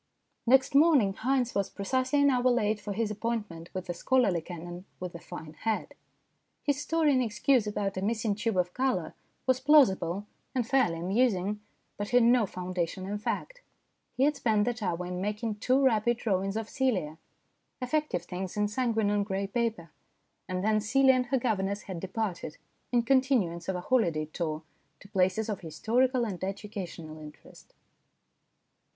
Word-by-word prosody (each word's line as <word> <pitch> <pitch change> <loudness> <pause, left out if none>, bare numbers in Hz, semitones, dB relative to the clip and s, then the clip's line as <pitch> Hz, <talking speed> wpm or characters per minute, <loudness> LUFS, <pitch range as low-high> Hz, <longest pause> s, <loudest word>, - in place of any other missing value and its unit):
Next 265 +3 +5
morning 280 -9 +5
Haynes 250 +2 0
was 200 -1 0
precisely 260 +7 0
an 285 - +5
hour 250 0 +3
late 220 -3 +1
for 205 0 -6
his 210 +1 -1
appointment 210 -6 -4
with 185 -1 -5
the 175 - -3
scholarly 195 -2 +2
canon 175 +2 -8
with 180 -1 -5
the 170 - -7
fine 160 -3 -9
head. 220 +4 -2 0.7
His 285 -1 0
story 320 -2 +2
in 255 - +3
excuse 240 0 +2
about 200 -2 -2
a - - -1
missing 215 +1 0
tube 215 0 -1
of 180 0 +1
colour 260 0 0 0.3
was 260 -1 +2
plausible 220 - +4 0.3
and 250 -3 +1
fairly 240 -12 +2
amusing, 200 +1 +1 0.4
but 205 0 -3
had 245 -1 +5
no 235 -2 +4
foundation 180 0 -3
in 205 +2 -3
fact. - - -4 0.6
He 260 - +3
had 295 +1 +3
spent 220 -6 +2
that 245 -1 -2
hour 180 -2 -2
in 180 0 -4
making 210 +2 -2
two 255 +5 +2
rapid 235 -1 +3
drawings 195 -2 -1
of 225 -1 -3
Celia 190 - -1 0.6
effective 280 - -1
things 185 +2 -5
in 210 0 +2
sanguine 225 -3 +1
on 205 0 +2
grey 195 -1 -2
paper. 215 -6 -2 0.6
And 185 0 -2
then 215 0 +2
Celia 265 +5 +4
and 255 -1 +1
her 265 - +1
governess 205 -4 -1
had 185 -3 -6
departed 190 -4 -4 0.3
in 240 -1 +3
continuance 240 -10 +2
of 190 - 0
a 180 - -3
holiday 175 -10 +1
tour 155 0 -4 0.4
to - - -14
places 190 +2 +1
of 210 -3 -3
historical 240 - +1
and 190 -5 -5
educational 190 -5 -6
interest. 150 -1 -14
210 Hz, 165 wpm, -29 LUFS, 185-250 Hz, 0.7 s, Next